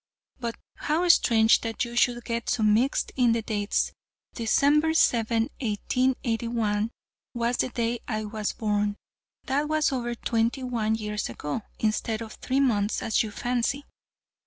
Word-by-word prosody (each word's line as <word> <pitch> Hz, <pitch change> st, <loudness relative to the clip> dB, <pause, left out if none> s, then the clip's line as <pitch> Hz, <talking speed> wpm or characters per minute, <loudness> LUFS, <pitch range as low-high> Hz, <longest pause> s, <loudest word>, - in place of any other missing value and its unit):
But 235 Hz, -2 st, -3 dB, 0.2 s
how 330 Hz, +4 st, 0 dB
strange 225 Hz, -8 st, +5 dB
that 225 Hz, +2 st, -2 dB
you 235 Hz, 0 st, -8 dB
should 240 Hz, 0 st, +2 dB
get 230 Hz, 0 st, -2 dB
so 225 Hz, -, +1 dB
mixed 220 Hz, +6 st, +2 dB
in 245 Hz, -3 st, +4 dB
the 230 Hz, -1 st, -1 dB
dates 205 Hz, -1 st, 0 dB, 0.4 s
December 290 Hz, +7 st, +3 dB
7, 230 Hz, -5 st, +3 dB, 0.2 s
1881, 230 Hz, -2 st, 0 dB, 0.5 s
was 235 Hz, +1 st, 0 dB
the -, -, 0 dB
day 235 Hz, -1 st, -1 dB
I 215 Hz, -2 st, -2 dB
was 210 Hz, 0 st, -3 dB
born. 210 Hz, -1 st, -1 dB, 0.5 s
That 285 Hz, +3 st, 0 dB
was 310 Hz, -1 st, +2 dB
over 240 Hz, -2 st, -2 dB
twenty 230 Hz, +3 st, 0 dB
one 225 Hz, -3 st, 0 dB
years 210 Hz, -, -3 dB
ago, 145 Hz, -, -4 dB, 0.2 s
instead 220 Hz, +1 st, -1 dB
of 220 Hz, -, -9 dB
three 265 Hz, +1 st, -1 dB
months, 215 Hz, -6 st, +1 dB
as 220 Hz, -, +2 dB
you 220 Hz, -, -2 dB
fancy." 245 Hz, +6 st, -1 dB
230 Hz, 145 wpm, -26 LUFS, 220-250 Hz, 0.5 s, strange